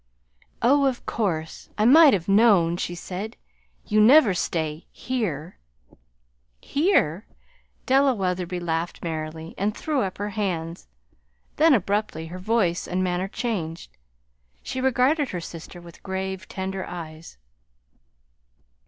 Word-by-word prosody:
"Oh, 280 +4 +4
of 255 -2 -3
course! 165 -8 -3
I 215 - +2
might 300 +4 +8
have 180 -4 -1
known," 195 -5 +4
she 175 0 -4
said. 195 +6 -6 0.5
"You 215 0 +3
never 240 -2 +7
stay 160 -3 -3
here." 190 - -4 1.0
"Here!" 255 - +1 0.6
Della 270 0 +4
Wetherby 180 -2 -2
laughed 170 0 -3
merrily, 160 0 -5
and 205 +2 -1
threw 300 -4 -1
up 190 -4 -3
her 205 +1 -3
hands; 175 -5 -3 0.7
then, 315 -2 +6
abruptly, 200 -5 -1
her 175 +3 -8
voice 185 -3 0
and 185 +1 -1
manner 180 +1 -1
changed. 170 - -4 0.7
She 260 - -4
regarded 265 +3 +2
her 180 - -4
sister 170 +1 -9
with 170 -1 -14
grave, 190 +1 -4
tender 190 0 -4
eyes. 160 - -9
190 Hz, 120 wpm, -24 LUFS, 170-230 Hz, 1.0 s, might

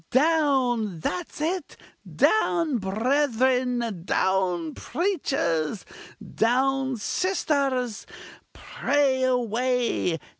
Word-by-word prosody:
down! 260 - +2
that's 350 - -4
it 330 +1 -3 0.4
down 335 - +2
brethren! 245 - 0
down 180 -3 0
preachers! 270 - -1 0.5
down 265 +2 +1
sisters! 275 - -1 0.4
pray 275 -3 0
away! 250 -6 0
255 Hz, 65 wpm, -25 LUFS, 220-285 Hz, 0.5 s, down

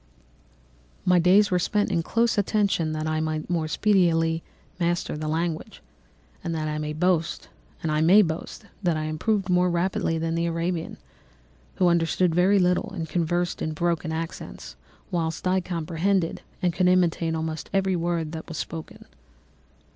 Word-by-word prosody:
"My 180 -1 +5
days 195 +4 +5
were 180 - +3
spent 205 +4 0
in 165 - +1
close 230 +7 +1
attention, 200 -5 +1
that 155 0 -3
I 155 0 0
might 155 +1 -2
more 165 -2 0
speedily 165 -3 +2 0.4
master 175 -2 0
the 155 0 -4
language; 160 +1 -3 0.6
and 165 -1 -2
I 155 -1 -2
may 150 0 -3
boast 170 -3 0 0.3
that 165 +1 +1
I 155 - -2
improved 190 +6 -1
more 180 0 +3
rapidly 175 0 0
than 165 0 -1
the 170 0 0
Arabian, 170 0 -2 0.8
who 180 - +3
understood 170 0 +2
very 185 +4 +4
little 180 -1 +2
and 165 -3 -4
conversed 175 +1 -1
in 155 - -2
broken 170 0 -1
accents, 160 - -6 0.4
whilst 165 0 -1
I 185 +1 +2
comprehended 175 +1 -1 0.2
and 175 -1 +2
could 180 +1 +2
imitate 170 -2 +2
almost 160 0 -4
every 190 -1 +1
word 170 -2 -1
that 160 -1 -7
was 165 - -6
spoken. 160 +2 -7
170 Hz, 145 wpm, -25 LUFS, 160-180 Hz, 0.8 s, My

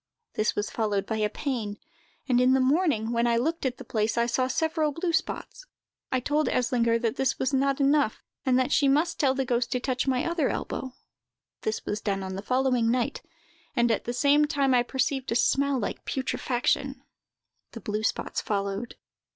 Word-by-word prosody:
This 215 - 0
was 205 - -2
followed 205 -3 -1
by 220 - -2
a 210 -1 +1
pain; 225 -5 -3 0.5
and 250 -2 +3
in 255 +1 +5
the 265 - +4
morning, 260 -5 +2
when 235 0 +2
I 235 -1 +2
looked 315 +4 0
at 250 -1 -4
the - - -9
place, 220 -2 -1
I 235 - +3
saw 255 +2 0
several 315 +2 0
blue 335 +3 -2
spots. - - -3 0.4
I 260 - +2
told 295 +4 0
Eslinger 235 -2 +2
that 230 +1 -1
this 265 -1 +1
was 265 +2 -1
not 275 +1 +2
enough, 280 -4 +2 0.2
and 255 -1 +3
that 255 -1 +1
she 285 - +4
must 305 +5 +2
tell 270 -3 +3
the 270 -1 0
ghost 240 0 0
to 250 - 0
touch 255 +1 -1
my 255 -1 +1
other 335 -5 +1
elbow. 260 -1 -4 0.7
This 220 - -3
was 210 +1 -3
done 195 -2 -1
on 190 0 -5
the 195 - -4
following 250 0 +1
night, 245 0 0 0.5
and, 240 -2 +3
at 220 - -1
the 240 - -2
same 285 +4 +4
time, 280 -3 +1
I 245 - +5
perceived 265 +1 -1
a - - +1
smell 280 +3 +2
like 230 - -4
putrefaction. 265 +1 -1 0.7
The 230 - -7
blue 210 -1 -3
spots 220 - -1
followed." 200 +2 -3
255 Hz, 195 wpm, -27 LUFS, 230-275 Hz, 0.7 s, in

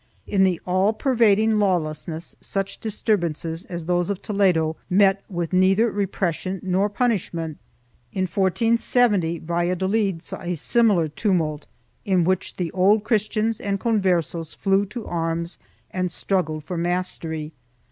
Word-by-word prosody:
2 - - -14
In 195 -2 +4
the 185 -3 +2
all 185 +4 +2
pervading 220 -3 +3
lawlessness 165 -3 -1
such 195 0 -3
disturb 215 -2 0
ances 165 0 -4
as 170 -2 -5
those 175 +1 +1
of 200 -2 -2
Toledo 180 -7 +1
met 195 +1 +4
with 175 -2 -3
neither 195 +5 +4
repression 190 -2 -2
nor 190 +2 +1
punish 220 -2 0
ment. 160 -2 -4 0.5
In 190 - -1
1470 195 0 +2
Valladolid 180 +2 0
saw - - -7
a 175 -1 -2
similar 200 - +3
tumult, 155 -3 -1 0.4
in 185 -3 +2
which 185 +2 0
the 175 -3 -3
Old 200 +3 +3
Christians 215 0 0
and 200 -1 -1
Converses 180 -7 0
flew 195 0 +1
to 225 +2 -7
arms 170 0 -2 0.3
and 185 -1 -2
struggled 160 -4 -1
for 180 +2 -5
mastery. 165 -3 -3
185 Hz, 135 wpm, -23 LUFS, 170-205 Hz, 0.5 s, In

